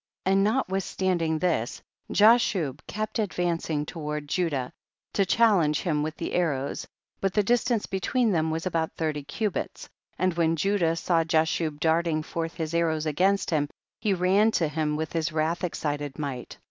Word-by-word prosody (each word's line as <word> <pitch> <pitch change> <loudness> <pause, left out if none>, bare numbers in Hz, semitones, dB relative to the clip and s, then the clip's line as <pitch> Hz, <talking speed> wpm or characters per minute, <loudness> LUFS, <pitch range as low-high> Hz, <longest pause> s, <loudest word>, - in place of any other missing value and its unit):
31. 190 +1 +3
And 195 - +4
notwithstanding 190 -7 0
this, 155 -9 -1 0.3
Ja 215 +3 +7
shub 165 - -1
kept 215 +3 -3
advancing 170 -6 -1
toward 150 -2 -5
Judah, 145 -6 -1 0.4
to 195 -2 +2
challenge 180 -9 +3
him 155 -5 0
with 155 +1 -3
the - - -4
arrows, 145 -6 -1 0.3
but 195 -1 -1
the 210 - +4
distance 240 0 +1
between 225 +5 0
them 160 -3 +1
was 160 +2 -2
about 165 -3 -1
thirty 155 -2 -2
cubits, 190 +8 -3 0.3
and 185 0 +1
when 165 -1 +2
Judah 175 -1 +1
saw 165 0 +1
Jashub 160 -1 0
darling 160 -1 +1
forth 165 +1 -4
his 160 -1 -3
arrows 160 -2 +1
against 185 +7 +1
him, 145 -3 +1 0.3
he 205 -3 +1
ran 190 +4 +4
to 165 - +2
him 150 0 -1
with 155 0 -3
his 165 -1 0
wrath 160 +3 -1
excited 145 -5 -3
might. 135 -5 -5
165 Hz, 160 wpm, -27 LUFS, 155-190 Hz, 0.4 s, Ja